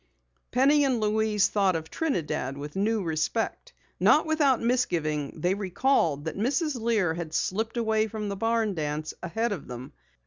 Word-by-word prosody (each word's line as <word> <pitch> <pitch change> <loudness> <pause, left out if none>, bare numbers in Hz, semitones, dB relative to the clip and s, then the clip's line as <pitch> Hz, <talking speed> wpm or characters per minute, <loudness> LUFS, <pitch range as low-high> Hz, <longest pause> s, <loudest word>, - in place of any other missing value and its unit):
Penny 280 +4 +4
and 260 -4 +1
Louise 215 -1 +2
thought 195 -3 +2
of 160 0 -5
Trinidad 160 - -2
with 145 +1 -7
new 210 +2 +1
respect. 170 - -2 0.3
Not 310 - +5
without 300 -5 +3
misgiving 160 - -1
they 180 +3 +2
recalled 185 - +1
that 160 - -3
Mrs. 260 - 0
Lear 215 -8 +1
had 165 -2 -5
slipped 220 +5 -1
away 220 -1 +1
from 215 -1 -5
the 200 - -3
barn 225 0 0
dance 155 -2 -3
ahead 225 +7 -1
of 185 -8 -5
them. 125 +1 -8
210 Hz, 160 wpm, -27 LUFS, 160-235 Hz, 0.3 s, Not